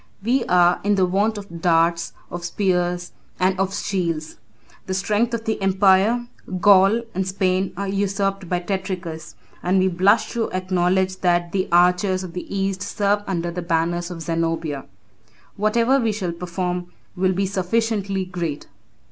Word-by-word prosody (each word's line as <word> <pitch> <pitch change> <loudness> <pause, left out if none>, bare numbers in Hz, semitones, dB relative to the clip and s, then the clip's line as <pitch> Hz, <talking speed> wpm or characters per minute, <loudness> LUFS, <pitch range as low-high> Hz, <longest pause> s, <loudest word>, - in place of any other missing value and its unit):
We 245 +3 +2
are 175 -2 +4
in 205 0 +2 0.2
want 210 +3 +1
of 170 -5 -9
darts, 170 0 +2 0.2
of 175 0 -5
spears, 180 -1 -1 0.3
and 185 0 +1
of 190 0 +1
shields. 170 -6 -2 0.5
The 185 - -2
strength 210 +5 +1
of 225 -1 -6
the 220 -2 -2
empire, 195 +4 +3 0.3
Gaul, 200 +4 +5
and 190 +1 -1
Spain, 190 0 0
are 200 +1 -2
usurped 195 -1 -1
by 180 -1 0
Tetricus, 180 -4 -4 0.3
and 180 +2 +1
we 190 0 +3
blush 200 +5 +3
to 235 -2 -1
acknowledge 185 0 +1
that 175 -1 +1
the 190 0 -1
archers 180 +2 +3
of 180 -2 -8
the 180 - -7
East 195 -1 -1
serve 200 0 0
under 175 -2 -2
the 180 +1 -4
banners 170 +1 -1
of 170 -2 -6
Zenobia. 165 -3 -2 0.7
Whatever 230 +6 +2
we 230 -3 +1
shall 195 -4 -3
perform 180 +1 -3 0.3
will 185 +1 +1
be 195 +2 0
sufficiently 195 0 -1
great." 170 -5 -4
185 Hz, 150 wpm, -22 LUFS, 175-200 Hz, 0.7 s, Gaul